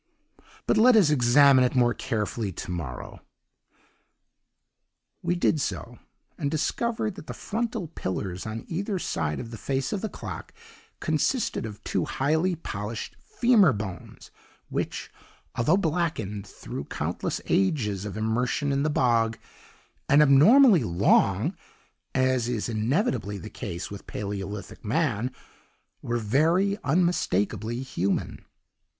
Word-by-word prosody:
"'But - - +2
let 245 +2 +7
us 190 -9 +5
examine 135 0 +6
it 125 - 0
more 120 -2 +4
carefully 110 -4 -2
to 90 - -6
morrow.' 75 -9 -6 2.0
"We 175 0 0
did 160 -3 +2
so, - - -4 0.4
and 140 - 0
discovered 220 +8 -1
that 195 - -11
the - - -6
frontal 225 -4 -3
pillars 95 - -4
on 110 +1 -5
either 195 +4 -2
side 75 - -2
of 115 -2 -7
the 115 - -8
face 135 - -2
of 200 - -2
the 220 - -2
clock - - -8 0.4
consisted 160 - 0
of 105 -1 -10
two - - -1
highly 160 +6 +1
polished 105 -8 -5
femur 220 - +4
bones 95 -5 -7 0.4
which, - - -3 0.4
although 150 +10 +3
blackened 155 - -1
through - - -7
countless - - -3
ages 100 -2 +1
of 105 -2 -5
immersion 125 +6 0
in 140 0 +1
the 155 - +1
bog, 115 -5 +2 0.7
and 145 +2 +7
abnormally 185 - +7
long 85 -5 +2 0.6
(as 130 -2 +2
is 115 -4 -1
inevitably 115 - 0
the 110 +2 -9
case 90 -7 -6
with 100 - -9
Paleolithic 100 0 -5
man), 120 -1 0 0.7
were 120 0 -1
very 165 - +2
unmistakably 125 - 0
human. 100 -7 -2
130 Hz, 125 wpm, -26 LUFS, 105-170 Hz, 2.0 s, let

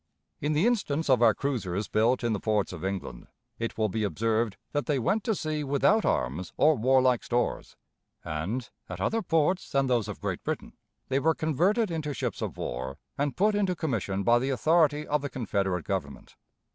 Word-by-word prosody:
In 150 +2 0
the 155 +6 +2
instance 165 - +1
of 125 -2 +4
our 115 -4 +6
cruisers 105 -7 -2
built 115 +4 +2
in 115 -1 +1
the 105 - -1
ports 105 -3 0
of 85 -1 -8
England, 95 -11 -4 0.3
it 115 0 -3
will 110 -1 +2
be 110 +2 -2
observed 110 +3 0
that 145 -1 -1
they 145 -3 +2
went 195 - +1
to 225 -3 +1
sea 155 -3 -2
without 145 +10 +3
arms 75 +9 -1
or 155 - +5
warlike 130 0 +3
stores, 120 0 -1 0.5
and, 95 +11 -3 0.2
at - - -6
other 225 0 0
ports 170 +1 +1
than 135 -1 +2
those 120 -5 +1
of 105 - -6
Great - - -3
Britain, - - -4 0.4
they 135 +1 +2
were 160 +2 +2
converted 180 - +1
into 150 -3 -3
ships - - -3
of - - -4
war 65 +2 -4 0.2
and 145 0 -2
put 210 +3 +3
into 195 -3 +1
commission 105 - -2
by 120 +3 +4
the 130 +2 -1
authority 150 +2 +3
of 150 -1 0
the 145 - -4
Confederate 100 -8 -1
Government. 70 -9 -4
130 Hz, 190 wpm, -28 LUFS, 105-155 Hz, 0.5 s, our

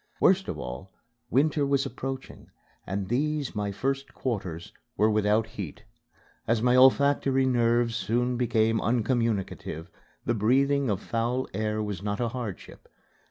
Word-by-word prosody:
Worst 190 +1 +4
of 75 - -4
all, 65 +8 -7 0.4
winter 145 +4 +2
was 140 0 +1
approaching 135 0 -6 0.4
and 95 0 -2
these, 145 +4 -1
my 105 -1 -2
first 135 +6 -3
quarters, 95 -9 -4 0.2
were 110 +1 +4
without 105 +1 +2
heat. 100 -8 -8 0.6
As 115 0 +2
my 125 +2 +3
olfactory 135 0 +4
nerves 120 -2 +2
soon 120 +2 0
became 115 -2 +2
uncommunicative, 115 - -1 0.3
the 120 - +1
breathing 135 +5 +2
of 100 -3 -1
foul 120 +3 -1
air 110 +1 -1
was 105 -4 -4
not 100 0 -2
a 120 -1 0
hardship. 115 -6 -7
115 Hz, 135 wpm, -27 LUFS, 105-130 Hz, 0.6 s, Worst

